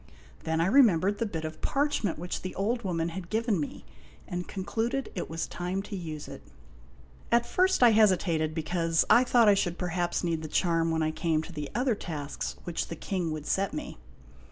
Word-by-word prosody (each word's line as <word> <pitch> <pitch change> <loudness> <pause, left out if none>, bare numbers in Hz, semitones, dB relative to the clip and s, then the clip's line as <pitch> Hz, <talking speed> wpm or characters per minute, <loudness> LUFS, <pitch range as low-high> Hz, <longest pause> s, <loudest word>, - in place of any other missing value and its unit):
Then 160 0 0
I - - +3
remembered 205 -4 +4
the 230 - 0
bit 165 -5 -4
of 155 0 -7
parchment 275 - 0
which 175 +3 -4
the 185 - -6
old 230 +5 0
woman 170 -3 -1
had 175 0 -7
given 220 -3 +1
me, 145 - -5 0.4
and 180 0 -4
concluded 230 +7 -2
it - - -4
was 165 +1 -2
time 180 +2 -3
to 205 - -6
use 160 -5 -6
it. - - -9 0.9
At 235 0 +4
first 370 0 +2
I 235 -2 +7
hesi 210 -4 +6
tated, 160 -4 -1
because 165 0 +1
I 245 - +7
thought 240 -3 +4
I 205 - +8
should 175 -3 0
perhaps 175 0 -1
need 165 -2 -1
the 155 - -5
charm 165 +1 +1
when 160 -1 +1
I 155 - +1
came 160 -1 0
to 175 - -10
the 150 -2 -5
other 250 +1 +2
tasks 150 -8 -5
which 175 -1 -3
the 165 - -5
King 180 0 -2
would 155 -1 -5
set 195 +4 0
me. 305 - -6
180 Hz, 200 wpm, -28 LUFS, 165-215 Hz, 0.9 s, I